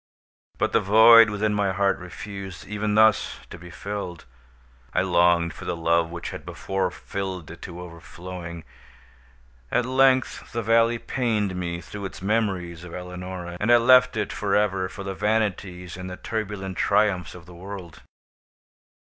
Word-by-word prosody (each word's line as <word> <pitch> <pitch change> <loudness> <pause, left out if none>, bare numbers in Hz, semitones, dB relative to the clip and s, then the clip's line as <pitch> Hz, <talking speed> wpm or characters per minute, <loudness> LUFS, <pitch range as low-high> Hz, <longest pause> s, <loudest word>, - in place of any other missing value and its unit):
But - - 0
the - - +4
void 110 +3 +8
within 105 +1 0
my 100 -2 +1
heart 100 +1 +1
refused, 95 +1 -8
even 105 +1 -1
thus, 110 -1 +4
to 85 - -9
be 90 +1 -11
filled. 100 -2 -6 0.7
I 90 - +3
longed 85 -2 +3
for - - -10
the 90 - -2
love 85 0 +1
which 85 0 -6
had - - -8
before 95 -1 -2
filled 95 -3 -6
it 85 - -12
to 90 -1 -8
overflowing. 85 0 -9 1.1
At 125 - +1
length 130 0 +2
the 115 0 -2
valley 115 +2 +3
pained 110 -6 -1
me 85 -1 -3
through 100 +3 -8
its 95 - -7
memories 95 -5 -1
of 90 -2 -9
Eleonora, 90 -1 -7
and 110 +3 +2
I 120 - +8
left 125 -1 +5
it 105 - -2
for 100 -2 0
ever 95 -3 +1
for 100 - -8
the 95 0 -4
vanities 100 -4 -1
and 90 0 -7
the 90 - -7
turbulent 105 -4 -4
triumphs 95 -5 +1
of 85 -3 -12
the 90 - -13
world. 90 -1 -9
95 Hz, 160 wpm, -24 LUFS, 90-105 Hz, 1.1 s, void